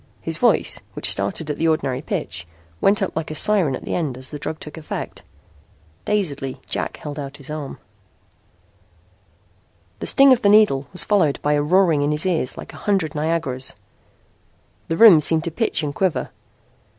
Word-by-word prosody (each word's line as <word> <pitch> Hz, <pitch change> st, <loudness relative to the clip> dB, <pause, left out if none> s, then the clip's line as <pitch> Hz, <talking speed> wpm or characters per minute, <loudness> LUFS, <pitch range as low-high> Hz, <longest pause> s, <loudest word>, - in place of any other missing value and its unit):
His -, -, -5 dB
voice, -, -, +2 dB
which -, -, -1 dB
started 100 Hz, +11 st, -1 dB
at 145 Hz, -, -5 dB
the 165 Hz, -, +1 dB
ordinary 135 Hz, -5 st, 0 dB
pitch, 85 Hz, -, -4 dB, 0.3 s
went 195 Hz, 0 st, +3 dB
up 190 Hz, -, -4 dB
like 160 Hz, 0 st, -3 dB
a 155 Hz, -, -5 dB
siren 180 Hz, -8 st, +3 dB
at -, -, -9 dB
the -, -, -4 dB
end 145 Hz, -8 st, -2 dB
as 130 Hz, 0 st, -6 dB
the 150 Hz, -, -6 dB
drug 155 Hz, +2 st, -5 dB
took 150 Hz, -, -9 dB
effect. 160 Hz, -2 st, -7 dB, 0.8 s
Dazedly 145 Hz, -11 st, -2 dB
Jack -, -, -3 dB
held 150 Hz, -1 st, -7 dB
out 140 Hz, 0 st, -7 dB
his 140 Hz, +1 st, -8 dB
arm. 150 Hz, -3 st, -6 dB, 2.2 s
The -, -, -3 dB
sting 275 Hz, -1 st, +6 dB
of 250 Hz, -, 0 dB
the 200 Hz, -, +3 dB
needle 200 Hz, -11 st, +4 dB
was 180 Hz, -, +3 dB
followed 180 Hz, -9 st, +1 dB
by 150 Hz, -, +2 dB
a 145 Hz, -, +2 dB
roaring 170 Hz, -1 st, +3 dB
in 145 Hz, -, +1 dB
his 150 Hz, +3 st, +1 dB
ears 170 Hz, -8 st, -1 dB
like -, -, -9 dB
a -, -, -11 dB
hundred 190 Hz, -7 st, -1 dB
Niagaras. 150 Hz, -4 st, -2 dB, 1.1 s
The 165 Hz, -, -2 dB
room 205 Hz, -7 st, +8 dB
seemed 160 Hz, +1 st, +2 dB
to 170 Hz, -, -4 dB
pitch 160 Hz, -, 0 dB
and 145 Hz, -1 st, -3 dB
quiver. 185 Hz, +1 st, -1 dB
155 Hz, 180 wpm, -21 LUFS, 145-180 Hz, 2.2 s, room